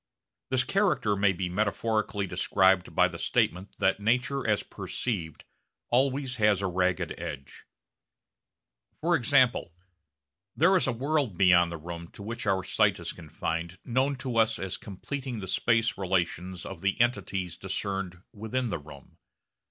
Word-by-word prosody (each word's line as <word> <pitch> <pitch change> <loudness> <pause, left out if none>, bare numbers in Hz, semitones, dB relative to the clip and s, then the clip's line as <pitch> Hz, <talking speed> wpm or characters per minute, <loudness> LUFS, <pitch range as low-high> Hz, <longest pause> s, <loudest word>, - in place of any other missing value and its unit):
This 130 -1 +3
character 185 - +1
may 100 -1 +3
be 90 0 -2
metaphorically 105 +2 0
described 95 0 +2
by - - +5
the - - -8
statement 90 +5 0
that 95 0 +2
nature 125 +5 +1
as 105 -1 +2
perceived 85 - -4 0.5
always 130 0 +1
has 105 -3 +3
a - - +1
ragged 90 0 0
edge. 70 -1 -7 1.3
For 170 +2 +2
example, 130 - +2 0.8
there 180 +5 +5
is 180 - +3
a - - +2
world 135 - -1
beyond 85 -2 +5
the 85 - -4
room 85 +1 -7
to 100 - -10
which 115 +1 -5
our 95 -1 +2
sight - - +2
is - - -5
confined 85 +2 -4
known 130 +4 +1
to 130 -2 -4
us 110 0 +3
as 95 -2 -4
completing 125 +5 -6
the 95 - -5
space 115 +4 +2
relations 90 -1 -1
of 95 -4 -8
the 100 +4 0
entities 95 -7 0
discerned 95 -1 -4
within 110 +2 -2
the 80 - -2
room. 70 -2 -14
100 Hz, 145 wpm, -28 LUFS, 90-125 Hz, 1.3 s, by